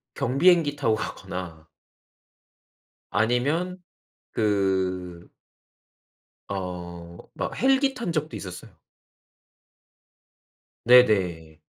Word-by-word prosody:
경비행기 150 +3 +3
타고 115 -6 +2
가거나 85 -6 -7 1.4
아니면 140 - 0 0.6
그 95 -4 -1 1.2
어 85 -2 -6 0.2
막 - - -4
헬기 270 +1 +3
탄 235 -9 -4
적도 155 -1 -2
있었어요. 90 -2 -9 2.1
네네. 95 -10 +4
105 Hz, 135 characters per minute, -25 LUFS, 90-145 Hz, 2.1 s, 네네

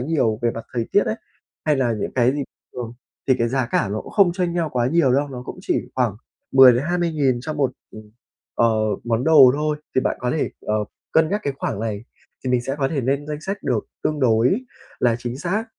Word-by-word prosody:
nhiều 125 -6 0
về 120 - +2
mặt 115 0 -7
thời 115 -2 -2
tiết 205 - +5
ấy, - - 0 0.5
hay 150 -2 +2
là 125 -3 +1
những 110 - -3
cái 125 0 +3
gì 145 0 -2 0.3
thường 120 -2 -6 0.4
thì 130 - +6
cái 115 - +1
giá 130 0 0
cả 115 - 0
ló 105 +2 -3
không 195 -5 +2
chênh 180 -1 -1
nhau 170 -2 0
quá 120 -1 +1
nhiều 140 -2 +3
đâu, 140 +2 +1
nó 125 -2 -7
cũng - - -8
chỉ - - 0
khoảng 120 -6 0 0.4
10-20 140 +7 +5
nghìn 135 -5 +1
cho 155 +5 -4
một, 140 -4 0 0.2
ừm, 110 -1 -12 0.4
ờ, 115 - +3 0.4
món 120 +1 0
đồ 150 -5 +8
thôi. 150 +1 -1 0.2
Thì - - +4
bạn - - -1
có 125 -1 -1
thể, 155 - -1
ờ, 105 - -2 0.4
cân 160 0 +4
nhắc 205 +4 -1
cái 140 - 0
khoảng 100 - -3
này 110 -1 -3 0.4
thì 130 - -1
mình 125 -1 +3
sẽ 135 +3 -3
có 135 -2 +1
thể 140 -1 -1
lên 140 +3 -1
danh 150 0 -5
sách 195 +5 -5
được 120 -5 -1 0.2
tương 150 -1 -1
đối 125 - +3 0.4
là 120 -2 +2
chính 120 +1 -5
xác, 185 +8 -1
130 Hz, 230 wpm, -22 LUFS, 120-155 Hz, 0.5 s, đồ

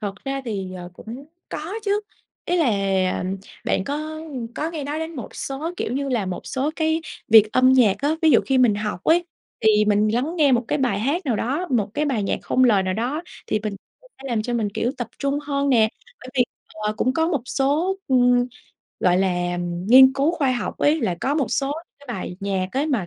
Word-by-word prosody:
Thật 200 -3 -3
ra 275 0 -2
thì, 195 -5 -4
ờ, 180 -1 -8
cũng 240 +9 -9 0.2
có 325 +6 -5
chứ. 410 0 +1 0.4
Ý 355 - 0
là 330 - +3 1.0
bạn 190 - 0
có, 280 - -2 0.2
ưm, 270 -7 -7
có 315 +2 -2
nghe 310 -4 -5
nói 295 +2 -3
đến 320 0 -5
một 245 - -7
số, 280 +5 -4
kiểu - - -3
như 275 +2 -2
là, 235 -7 0
một 185 -1 -5
số 275 +3 -1
cái 320 0 +1 0.3
việc 215 -1 +7
âm 255 0 +5
nhạc 235 -7 +5
á, 290 +3 +1
ví 320 - +6
dụ 245 - +6
khi 265 -1 +2
mình 245 -5 +5
học 205 -3 -4
ấy, 345 +2 +4 0.4
thì 215 -1 +4
mình 210 0 +3
lắng 285 +9 -1
nghe 295 -5 +4
một 240 -1 +2
cái 295 - 0
bài 245 -8 +1
hát 300 - -1
nào 240 -5 +1
đó, 280 - -1
một 215 -5 +1
cái 300 - 0
bài 260 -8 0
nhạc 195 - -1
không 255 - +2
lời 210 -6 +4
nào 185 0 -1
đó, 250 - -2 0.2
thì 215 - 0
mình 210 -2 -3 0.3
sẽ 470 - -12
làm 230 -3 0
cho 240 +2 -3
mình, 220 -3 0
kiểu, 240 - 0
tập 245 -3 -4
trung 280 0 0
hơn 280 -1 -1
nè. 225 -5 +4 0.3
Bởi 255 - -11
vì, 250 -2 +4 0.3
ờ, 215 0 -2
cũng 255 +4 +1
có 320 +3 +1
một 295 -8 -1
số, 290 +8 0
ừm, 245 -1 +4 0.5
gọi 180 -1 +3
là, 175 -2 0
ừm, 175 0 -4
nghiên 260 +3 +8
cứu 275 +3 +2
khoa 280 -7 +1
học 245 - -3
ấy, 305 +2 +3
là 180 - 0
có 275 - 0
một 290 -4 +1
số 275 0 0 0.3
cái 285 - -18
bài 180 -1 -5
nhạc 195 -2 -1
ấy, 275 +3 0
mà 240 - 0
255 Hz, 230 wpm, -22 LUFS, 215-290 Hz, 1.0 s, nghiên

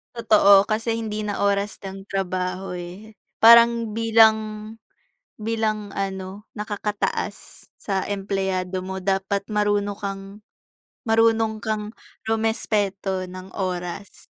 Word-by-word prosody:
Totoo 205 -3 +5
kasi 225 +1 -1
hindi 215 -1 -4
na 205 -1 -3
oras 200 0 0
ng 195 0 -8
trabaho 185 -1 -3
eh, 185 +5 -9 0.2
parang 230 -1 +6
bilang 220 -1 +3 0.6
bilang 215 -2 -2
ano, 195 0 -4 0.2
nakaka-taas 210 0 -4
sa 195 -2 -2
empleyado 190 -2 -2
mo 190 +1 -5
dapat 195 +1 -1
marunong 205 -1 0
kang 195 -1 -5 0.9
marunong 225 -1 +2
kang 215 0 -3 0.3
rumespeto 205 -4 -1
ng 185 +1 -10
oras. 180 +1 -5
205 Hz, 100 wpm, -23 LUFS, 195-220 Hz, 0.9 s, parang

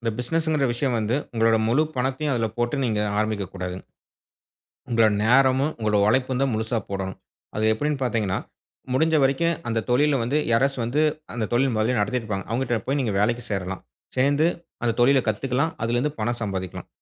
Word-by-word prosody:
இந்த 115 -1 -1
பிசினஸுங்கிற 155 +2 0
விஷயம் 120 0 0
வந்து, 110 +4 0 0.2
உங்களோட 115 0 +3
முழு 135 +7 +3
பணத்தையும் 135 +3 -1
அதுல 115 -2 +1
போட்டு 120 +4 0
நீங்க 110 -3 0 0.2
ஆரம்பிக்கக் 105 -3 -1
கூடாது. 90 -1 -4 1.1
உங்களோட 115 -1 +4 0.2
நேரமும், 130 +4 +4
உங்களோட 105 -2 +1
உழைப்பும் 130 +2 +1
தான் 135 - +1
முழுசா 110 +2 -1
போடணும். 95 -1 -4 0.4
அது 110 0 0
எப்படினு 145 +5 -1
பாத்தீங்கன்னா, 110 -6 0 0.5
முடிஞ்ச 160 +4 +3
வரைக்கும் 165 +5 +2
அந்த 115 -1 0
தொழில்ல 140 +3 +3
வந்து 135 +6 0
யாராச்சும் 135 +1 +2
வந்து, 145 +6 +1 0.3
அந்த 110 -3 -1
தொழில் 130 0 +2
மொதல்லயே 115 +3 +1
நடத்திட்ருப்பாங்க. 105 -3 -2
அவுங்கட்ட 120 -1 0
போய் 140 +1 +1
நீங்க 110 -5 -1
வேலைக்கு 120 +3 +1
சேரலாம். 95 -2 -3 0.4
சேர்ந்து, 140 +4 +3 0.4
அந்த 115 -2 +2
தொழிலக் 130 -1 +4
கத்துக்கலாம், 135 +8 -1
அதிலிருந்து 120 +6 0
பணம் 120 +2 -1
சம்பாதிக்கலாம். 95 -3 -4
120 Hz, 160 wpm, -24 LUFS, 110-135 Hz, 1.1 s, உங்களோட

